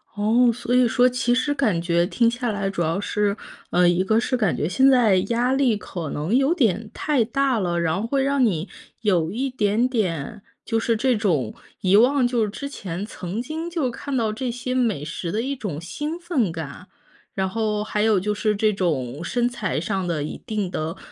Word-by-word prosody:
哦， 230 +4 +3
所 245 +1 -2
以 250 -1 +5
说 245 +2 +4
其 245 -1 +1
实 285 +3 +1
感 215 -12 +1
觉 170 0 +2
听 230 +4 +2
下 245 0 -2
来 200 -1 -2
主 190 -3 -3
要 165 +4 0
是， 205 0 0 0.3
呃， 175 0 +4
一 175 +2 +3
个 220 +3 +2
是 255 - 0
感 215 -8 +1
觉 150 - 0
现 265 +9 +4
在 240 -7 +5
压 240 +2 +1
力 260 -6 +2
可 170 -7 -6
能 160 +10 -1
有 275 +5 +3
点 220 - +1
太 290 -6 +1
大 265 0 +1
了， 175 -2 0
然 165 +2 0
后 225 - -2
会 270 +3 0
让 275 -1 +2
你 180 -5 -1 0.3
有 180 -6 +1
一 265 +5 -2
点 220 0 +1
点， 200 - -2 0.2
就 225 - 0
是 225 0 +1
这 255 +1 +2
种， 165 - 0 0.3
遗 190 +1 +3
忘 250 +3 +5
就 240 -3 +1
是 210 - -1
之 280 +7 -6
前 195 -8 -5
曾 195 +1 -5
经 315 +6 -5
就 325 -7 -1
看 270 +3 -4
到 220 -3 0
这 250 +2 -3
些 245 +1 -4
美 225 - 0
食 165 +2 -4
的 215 - -1
一 275 +3 -2
种 190 - -5
兴 295 - -5
奋 315 - 0
感。 160 +3 -7 0.5
然 190 -1 -1
后 215 -1 -1
还 210 0 -2
有 215 -2 +3
就 210 +3 -1
是 210 0 +1
这 215 +1 +2
种 150 -7 -2
身 240 +6 0
材 225 -9 -2
上 185 +3 -2
的 165 -4 -1
一 150 - -4
定 210 -5 -2
的 160 0 -4
215 Hz, 225 characters per minute, -23 LUFS, 180-250 Hz, 0.5 s, 以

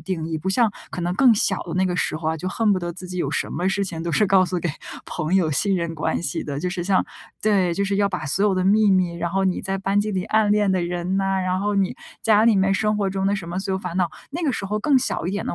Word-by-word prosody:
定 165 -1 -4
义。 160 - -2
不 190 +5 -2
像 225 +2 +3 0.2
可 - - -5
能 175 +1 -1
更 245 +2 +5
小 195 -2 +1
的 170 - -7
那 185 - +2
个 180 - -1
时 155 - -1
候 155 0 -2
啊， 160 - -1
就 180 +4 -4
恨 215 +2 +1
不 190 - +1
得 175 -1 -4
自 180 +1 -9
己 180 - -6
有 - - -1
什 - - -1
么 180 +2 -1
事 200 +1 0
情 165 -4 -5
都 170 -1 -3
是 210 - +3
告 190 -1 +4
诉 180 0 -2
给 175 0 -2 0.4
朋 155 +4 -2
友 180 -5 +3
信 195 +7 +1
任 170 -2 -3
关 160 - -1
系 140 -6 -2
的， 140 -2 -4
就 180 - -1
是 180 -1 -3
像 190 0 +2 0.4
对， 195 -5 +2
就 200 - 0
是 200 0 -1
要 200 0 +2
把 180 -5 -4
所 185 +8 +1
有 205 -2 +3
的 185 0 0
秘 210 +2 +4
密， 185 -2 +2
然 170 0 -2
后 195 +1 0
你 185 -1 0
在 195 0 -3
班 195 +1 +1
级 215 +1 -2
里 185 -1 -1
暗 215 -1 +2
恋 210 -1 +2
的 185 -2 +1
人 175 +2 -1
啊， 195 0 0
然 185 0 0
后 205 +1 0
你 195 -1 +1 0.3
家 215 -1 +4
里 230 -1 +5
面 195 0 +3
生 210 +1 +1
活 200 -2 0
中 190 0 -1
的 200 - +2
什 170 -3 -7
么 175 +2 -3
所 190 0 -2
有 190 - 0
烦 180 -2 -5
恼。 180 -2 +1 0.2
那 335 +4 -4
个 285 - +1
时 210 - -4
候 210 +2 -1
更 270 +5 +3
小 250 -9 -2
一 180 - -1
点 200 - -3
的， - - -2
190 Hz, 335 characters per minute, -22 LUFS, 175-200 Hz, 0.4 s, 更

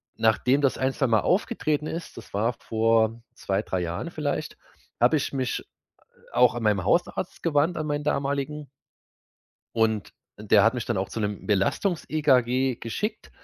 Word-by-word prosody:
nachdem 125 +5 +2
das 135 -2 +2
ein, 130 0 0
zweimal 115 -7 +2
aufgetreten 155 - 0
ist 165 +1 -6
das 115 - -11
war 110 +5 +1
vor 115 0 +1
2, 95 +1 -1
3 95 -4 -2
Jahren 85 0 -3
vielleicht, - - -3 0.4
habe 125 +6 +5
ich 140 - -3
mich, 130 -3 -1 0.5
äh, - - -25
auch 125 -1 +5
an 120 - -3
meinen 105 -3 +2
Hausarzt 175 - 0
gewandt, 160 +1 +2
an 155 - -2
meinen 145 -1 -1
damaligen. 140 +1 -2 1.1
Und 110 -2 0 0.3
der 105 -1 +4
hat 115 +2 +4
mich 120 -3 -3
dann 120 - -1
auch 95 +1 -2
zu - - -5
'nem 105 -1 -3
Belastungs 110 - +1
EKG 130 -4 +2
geschickt. 210 - -4
125 Hz, 160 wpm, -26 LUFS, 110-145 Hz, 1.1 s, habe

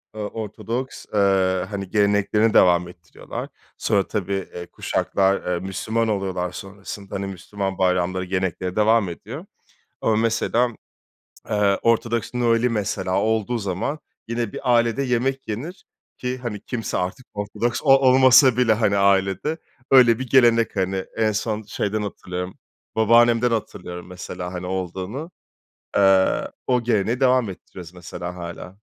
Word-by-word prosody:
eee, 110 - -5
Ortodoks, 115 +4 -5
eee, 95 -2 +2
hani 100 -2 -5
geleneklerini 105 +1 +2
devam 90 -1 +5
ettiriyorlar. 85 -1 -9 0.3
Sonra, 100 -3 +1
tabii, 100 -2 -2
eee, 85 0 -6
kuşaklar, 95 -2 0
eee, 85 - -1
Müslüman 110 +5 -2
oluyorlar 95 -4 -2
sonrasında, 100 +1 -8
hani 100 0 -3
Müslüman 95 +1 -5
bayramları 90 0 +1
gelenekleri 95 -1 -2
devam 110 -2 +3
ediyor. 85 - -8 0.6
Ama 110 - +2
mesela, 115 +2 +1 0.8
eee, 105 -2 +2
Ortodoks 115 +1 +1
Noel'i 120 0 +2
mesela 95 -4 -1
olduğu 110 +2 0
zaman 100 - -3 0.3
yine 115 -2 -2
bir 125 - 0
ailede 120 +3 +2
yemek 130 +1 -1
yenir 145 - -6 0.3
ki 125 0 -3
hani 115 -5 -5
kimse 120 -3 -3
artık 95 +8 -4
Ortodoks 105 +4 -2
o 135 -1 +7
olmasa 130 -1 +6
bile, 125 -3 +4
hani, 105 -2 +2
ailede 100 - +2 0.3
öyle 125 -3 +6
bir 130 - -5
gelenek 115 -4 +4
hani. 95 0 -1
En 110 -1 +2
son 110 +1 -2
şeyden 105 0 -2
hatırlıyorum, 90 -2 -5 0.4
babaannemden 115 +2 +4
hatırlıyorum 90 -5 -4
mesela, 90 0 -7
hani, 90 0 -5
olduğunu. 95 - -4 0.7
Eee, 95 -10 +4 0.2
o 125 -2 +2
geleneği 115 +1 +1
devam 130 -4 +3
ettiriyoruz 90 -1 -11
mesela 90 0 -7
hâlâ. 85 +1 -8
105 Hz, 135 wpm, -22 LUFS, 95-115 Hz, 0.8 s, o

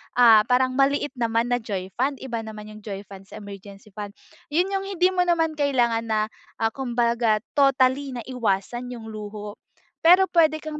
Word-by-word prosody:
ah, 225 -3 +7
parang 255 +1 +1
maliit 280 +1 +2
naman 230 0 0
na 245 - +2
joy 195 -5 -5
fund, 270 +2 -1
iba 240 -3 -4
naman 215 -1 -9
yung 215 0 -11
joy 195 -2 -5
fund 195 -1 -11
sa 215 - -11
emergency 200 +1 -11
fund. 205 0 -7 0.4
Yun 355 +5 +2
yung 390 0 -2
hindi 370 -1 +2
mo 360 -1 +1
naman 325 -3 +1
kailangan 240 -5 +1
na, 220 -1 0 0.4
ah, 225 - +3
kumbaga 235 -3 0 0.2
totally 270 0 +3
na 240 - -5
iwasan 240 0 -2
yung 225 -2 -9
luho, 210 -1 -8 0.5
pero 370 +3 +7
puwede 310 -2 +3
kang 305 -1 -6
240 Hz, 180 wpm, -24 LUFS, 215-285 Hz, 0.5 s, ah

